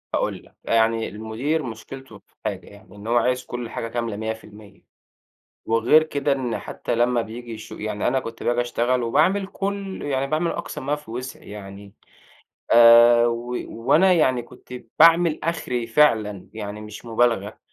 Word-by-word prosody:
هاقول -, -, -2 dB
لك. -, -, -23 dB
يعني 115 Hz, 0 st, +1 dB
المدير 110 Hz, +9 st, -3 dB
مشكلته 115 Hz, 0 st, -9 dB
في -, -, -38 dB
حاجة 100 Hz, -3 st, -4 dB
يعني، 100 Hz, -1 st, -16 dB
إن 105 Hz, +1 st, -10 dB
هو 120 Hz, +1 st, +2 dB
عايز 125 Hz, +1 st, +1 dB
كل 120 Hz, -1 st, -6 dB
حاجة 115 Hz, -, -4 dB
كاملة 115 Hz, -2 st, -3 dB
100%. 110 Hz, -1 st, -8 dB, 0.8 s
وغير 115 Hz, +7 st, +4 dB
كده 145 Hz, -2 st, -1 dB
إن 130 Hz, -4 st, -2 dB
حتّى -, -, -4 dB
لمّا 120 Hz, +1 st, +2 dB
بييجي 115 Hz, +2 st, -8 dB
يشو 110 Hz, 0 st, -10 dB
يعني 105 Hz, -1 st, -3 dB
أنا 130 Hz, +2 st, +1 dB
كنت 115 Hz, -1 st, -8 dB
باجي 120 Hz, 0 st, +1 dB
أشتغل 120 Hz, +1 st, 0 dB
وباعمل 185 Hz, +12 st, +2 dB
كل 195 Hz, -1 st, -4 dB
يعني 135 Hz, -1 st, -1 dB
باعمل 155 Hz, +4 st, 0 dB
أقصى -, -, -5 dB
ما 145 Hz, +3 st, -1 dB
في 150 Hz, -6 st, -14 dB
وسعي 125 Hz, 0 st, -7 dB
يعني، 100 Hz, -1 st, -10 dB, 0.8 s
آآ 120 Hz, 0 st, +8 dB
و 120 Hz, +1 st, -3 dB
وأنا 160 Hz, +11 st, +3 dB
يعني 130 Hz, -7 st, +2 dB
كنت 120 Hz, -, -16 dB, 0.3 s
باعمل 165 Hz, 0 st, +6 dB
آخري 125 Hz, -8 st, -2 dB
فعلًا 110 Hz, -6 st, +2 dB
يعني 105 Hz, -1 st, -6 dB
مش 105 Hz, +1 st, -10 dB
مبالغة. 115 Hz, -3 st, 0 dB
120 Hz, 160 wpm, -23 LUFS, 110-135 Hz, 0.8 s, آآ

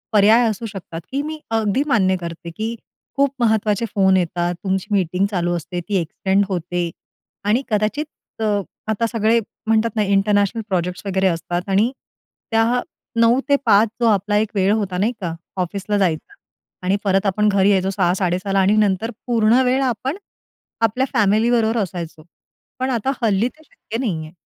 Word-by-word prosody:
पर्याय 220 Hz, +3 st, +6 dB
असू 215 Hz, +2 st, -4 dB
शकतात 175 Hz, -4 st, -7 dB
की 275 Hz, +1 st, 0 dB
मी 315 Hz, -, -6 dB, 0.2 s
अगदी 220 Hz, +5 st, +1 dB
मान्य 190 Hz, -4 st, +3 dB
करते, 170 Hz, 0 st, -6 dB
की 220 Hz, +1 st, -2 dB, 0.5 s
खूप 280 Hz, -1 st, +2 dB
महत्त्वाचे 220 Hz, 0 st, +2 dB
फोन 190 Hz, -1 st, +4 dB
येतात, 175 Hz, 0 st, -1 dB
तुमची 190 Hz, 0 st, -1 dB
मीटिंग 185 Hz, +1 st, +1 dB
चालू 175 Hz, -1 st, 0 dB
असते 175 Hz, +2 st, -5 dB
ती 205 Hz, -, 0 dB
एक्सटेंड 190 Hz, +4 st, 0 dB
होते 175 Hz, -1 st, -2 dB, 0.6 s
आणि 235 Hz, +6 st, +2 dB
कदाचित 215 Hz, +9 st, 0 dB, 0.4 s
अ, -, -, +1 dB, 0.4 s
आता 220 Hz, +2 st, +1 dB
सगळे 225 Hz, 0 st, +2 dB, 0.3 s
म्हणतात 225 Hz, 0 st, +2 dB
ना 215 Hz, -, +2 dB
इंटरनॅशनल 205 Hz, +2 st, +2 dB
प्रोजेक्ट्स 180 Hz, 0 st, -2 dB
वगैरे 190 Hz, 0 st, +1 dB
असतात 175 Hz, 0 st, -1 dB
आणि 210 Hz, +6 st, +3 dB, 0.6 s
त्या 225 Hz, 0 st, +4 dB, 0.6 s
9:00-5:00 245 Hz, -3 st, +3 dB
जो 235 Hz, -, +3 dB
आपला 205 Hz, +1 st, 0 dB
एक 215 Hz, -, -7 dB
वेळ 195 Hz, +1 st, +3 dB
होता 185 Hz, -3 st, -3 dB
नाही 215 Hz, +6 st, +1 dB
का, 170 Hz, -2 st, -2 dB, 0.3 s
ऑफिसला 200 Hz, +3 st, -2 dB
जायचा 180 Hz, -, -1 dB, 0.5 s
आणि 195 Hz, +2 st, +2 dB
परत 195 Hz, 0 st, +2 dB
आपण 210 Hz, +2 st, +2 dB
घरी 195 Hz, 0 st, +3 dB
यायचो 190 Hz, -1 st, +2 dB
6:00-6:30ला 185 Hz, +2 st, +1 dB
आणि 195 Hz, +2 st, +4 dB
नंतर 210 Hz, +2 st, +1 dB, 0.2 s
पूर्ण 235 Hz, +1 st, +4 dB
वेळ 260 Hz, +2 st, +2 dB
आपण 260 Hz, -, -3 dB, 0.7 s
आपल्या 255 Hz, +5 st, -1 dB
फॅमिली 220 Hz, 0 st, +3 dB
बरोबर 230 Hz, -1 st, +2 dB
असायचो. 170 Hz, -4 st, -6 dB, 0.6 s
पण 260 Hz, -, 0 dB
आता 250 Hz, +4 st, 0 dB
हल्ली 220 Hz, +1 st, +2 dB
ते 315 Hz, -, -23 dB
शक्य 225 Hz, -, -7 dB
नाहीये. 160 Hz, -10 st, -3 dB
205 Hz, 155 wpm, -20 LUFS, 185-225 Hz, 0.7 s, पर्याय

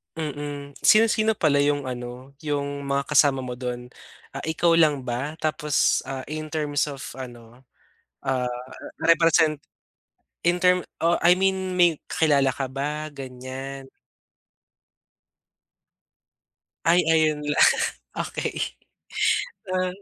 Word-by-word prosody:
Mm, 145 Hz, -2 st, -5 dB
sino-sino 220 Hz, 0 st, +4 dB
pala 145 Hz, -5 st, +2 dB
'yung 145 Hz, 0 st, +2 dB
ano, 125 Hz, +1 st, -7 dB
'yung 140 Hz, -2 st, -3 dB
mga 140 Hz, 0 st, 0 dB
kasama 140 Hz, -2 st, +4 dB
mo 125 Hz, -, -5 dB
do'n, 125 Hz, 0 st, -5 dB, 0.4 s
ah, 135 Hz, -, -6 dB
ikaw 165 Hz, +1 st, +2 dB
lang 155 Hz, -5 st, +4 dB
ba 130 Hz, +5 st, -3 dB
tapos, 155 Hz, -2 st, +1 dB
ah, 135 Hz, -1 st, -4 dB
in 155 Hz, 0 st, -4 dB
terms 150 Hz, -1 st, -1 dB
of 140 Hz, -2 st, -7 dB, 0.2 s
ano, 120 Hz, -1 st, -10 dB, 0.6 s
ah, 130 Hz, -2 st, -1 dB, 0.5 s
represent 165 Hz, -2 st, +4 dB, 0.8 s
in 175 Hz, +1 st, +2 dB
term, 180 Hz, 0 st, +3 dB, 0.2 s
oh, 170 Hz, 0 st, +3 dB
I 175 Hz, +1 st, +5 dB
mean 190 Hz, -1 st, 0 dB
may 175 Hz, -4 st, +4 dB
kilala 140 Hz, -4 st, +2 dB
ka 135 Hz, -2 st, -4 dB
ba 150 Hz, +3 st, -3 dB
ganiyan? 135 Hz, 0 st, -8 dB, 3.0 s
Ay 175 Hz, +2 st, +5 dB
ayun 155 Hz, -2 st, +3 dB
lang, 150 Hz, 0 st, +5 dB, 0.5 s
okey, -, -, -3 dB, 1.2 s
ah. 185 Hz, 0 st, +1 dB
145 Hz, 110 wpm, -24 LUFS, 135-160 Hz, 3.0 s, I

